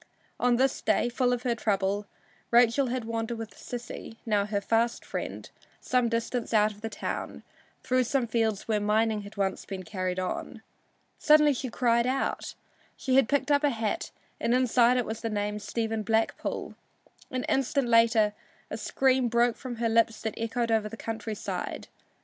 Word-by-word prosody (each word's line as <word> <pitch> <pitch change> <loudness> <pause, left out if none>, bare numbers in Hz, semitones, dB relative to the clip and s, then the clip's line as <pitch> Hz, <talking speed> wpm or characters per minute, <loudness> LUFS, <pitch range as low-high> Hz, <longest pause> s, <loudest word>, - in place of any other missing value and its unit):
On 245 0 +3
this 265 +2 +1
day, - - +2
full 245 +1 +1
of 245 0 -1
her 245 -2 +1
trouble, 205 -2 0 0.4
Rachel 240 +3 +4
had 245 -1 -2
wandered 230 +1 -3
with 225 -1 -6
Sissy, 235 -2 -8
now 205 -3 +1
her 210 -1 0
fast 230 +3 0
friend, - - -5 0.3
some 250 -2 +1
distance 230 0 -2
out 210 0 +4
of 210 0 -15
the 225 - -3
town, - - -5 0.4
through 255 0 +2
some 260 +1 +1
fields 220 -3 0
where 215 -2 +1
mining 215 +1 +1
had 205 +1 -12
once 195 -1 -1
been 190 -2 -6
carried 185 0 -3
on. 185 +4 -4 0.6
Suddenly 300 -1 +6
she 260 0 -4
cried 235 0 +2
out 265 +1 -2 0.4
she 260 - -1
had 270 -4 +5
picked 285 +1 +1
up 285 +1 +3
a 290 - +4
hat 225 +4 -2 0.3
and 235 - +2
inside 250 -1 +4
it 245 - +1
was 220 0 -5
the 230 - -2
name 210 0 -2
"Stephen 225 +1 -2
Blackpool." 220 +2 -1 0.6
An 255 -1 -2
instant 270 0 +1
later 230 -2 +4 0.4
a - - -3
scream 260 -2 +2
broke 235 0 +2
from 255 -3 -6
her 230 0 0
lips 225 0 +2
that 220 -2 -2
echoed 230 +1 -1
over 220 -1 +1
the 225 - -9
country 220 -1 -4
side. - - -5
230 Hz, 175 wpm, -28 LUFS, 215-245 Hz, 0.6 s, Suddenly